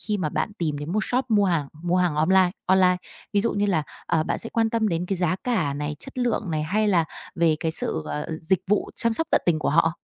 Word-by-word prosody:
khi 210 -1 -1
mà 160 - 0
bạn 210 - -2
tìm 155 -4 -1
đến 145 +3 -5
một 215 +2 +1
shop 255 +1 0
mua 205 -2 +4
hàng 165 -7 0
mua 175 +1 +1
hàng 180 -4 +1
online 180 +4 +4 0.2
online, 185 -1 +4 0.4
ví 205 - +3
dụ 230 - +1
như 205 0 +1
là, 170 -6 +1 0.2
ờ, 160 - +2
bạn - - -1
sẽ 230 - -3
quan 225 -1 +1
tâm 225 -2 +1
đến 175 0 -1
cái 195 - -1
giá 175 0 +1
cả 185 - 0
này, 150 +1 -3
chất 270 -1 -8
lượng 235 -6 0
này 155 -1 -1
hay 210 +7 +1
là 175 -5 +3 0.3
về 165 -2 +3
cái 160 - 0
sự, 80 - -2
ờ, 75 0 -3
dịch 175 +2 +2
vụ 205 +2 +1
chăm 230 -1 +1
sóc 325 +8 -1
tận - - +4
tình 165 -2 +3
của - - -1
họ? 165 +1 +3
180 Hz, 260 wpm, -24 LUFS, 160-210 Hz, 0.4 s, mua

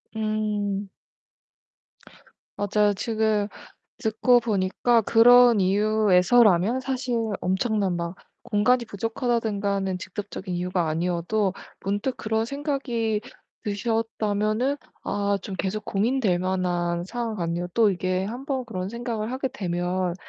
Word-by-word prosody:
음. 210 -2 -1 1.7
맞아요. 205 0 +2
지금 215 -1 0 0.5
듣고 240 +2 +3
보니까 225 +2 +1
그런 240 0 +6
이유에서라면 210 +2 +4
사실 260 -2 -2 0.3
엄청난 195 -1 0
막 170 +1 -4 0.3
공간이 235 +3 +2
부족하다든가 220 -2 -1
하는 190 -1 -1
직접적인 195 0 -6
이유가 180 -1 -1
아니어도 180 +5 0 0.3
문득 205 +7 -1
그런 220 0 -1
생각이 245 -6 -2 0.4
드셨다면은 220 +3 -1 0.3
아 200 0 0
좀 195 - -6
계속 205 +3 -3
고민될 210 -3 +1
만한 175 -2 -1
상황 230 +1 -3
같네요. 170 -1 -2
또 225 -2 +4
이게 185 +1 -1
1 245 +6 -6
번 265 -3 -2
그런 185 -5 -4
생각을 235 -1 -4
하게 265 +1 -1
되면 180 -5 -2
210 Hz, 255 characters per minute, -25 LUFS, 185-235 Hz, 1.7 s, 그런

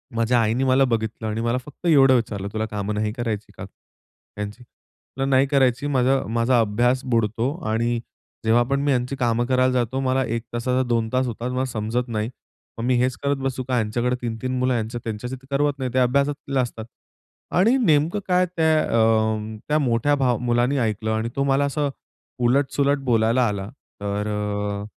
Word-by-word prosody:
माझ्या 115 +1 +2
आईने 115 +4 +1
मला 130 +1 +4
बघितलं 110 0 -2
आणि 110 +1 -2
मला 120 +2 0
फक्त 150 +4 -13
एवढं 135 -4 +6
विचारलं, 100 -4 -2
"तुला 110 0 -1
कामं 105 0 -2
नाही 105 0 -1
करायची 115 -4 -4
का - - -7
ह्यांची?" 105 +4 -11
म्हंटलं, 135 +3 -8
"नाही 135 +1 +4
करायची. 135 0 +2
माझा 130 +1 +3 0.2
माझा 120 +1 +3
अभ्यास 120 +4 +2
बुडतो 115 +3 +1 0.2
आणि 115 +1 0 0.5
जेव्हा 120 +2 +4
पण 140 0 +1
मी 145 0 +1
ह्यांची 125 +1 0
कामं 120 -2 +1
करायला 130 0 +2
जातो, 125 +1 0
मला 130 0 +1
1 115 0 -3
तासाचा 125 +2 0
2 115 -2 +1
तास 130 +1 +2
होतात, 120 +2 -4
मला 130 +1 -1
समजत 115 +3 -2
नाही, 110 0 -2 0.5
मग 115 - -4
मी 125 0 +2
हेच 125 -1 +1
करत 140 0 +1
बसू 130 -1 -2
का? 125 -1 +1
यांच्याकडे 120 +3 0
3-3 120 +2 -3
मुलं, 125 -4 0
त्यांच्याशी 120 +3 -5
तर 130 +1 -16
करवत 140 0 +1
नाही, 130 -2 -2
ते 130 - +2
अभ्यासात 140 +2 0
असतात." 115 -2 -6 0.7
आणि 230 +8 +4
नेमकं 165 - +2
काय, 180 0 +3
त्या 160 -3 +2 0.2
अं, 110 -1 +1
त्या 150 +1 +2
मोठ्या 130 +2 +2
भाव 125 -3 +1
मुलाने 120 +3 +1
ऐकलं 110 -1 -1
आणि 110 +1 -1
तो 140 - +1
मला 140 +1 +2
असं 145 0 -1 0.6
उलट-सुलट 140 +2 +2
बोलायला 115 +2 +3
आला. 100 0 -3 0.3
तर 100 +1 -2
अ, 105 -1 -2
125 Hz, 180 wpm, -23 LUFS, 110-135 Hz, 0.7 s, एवढं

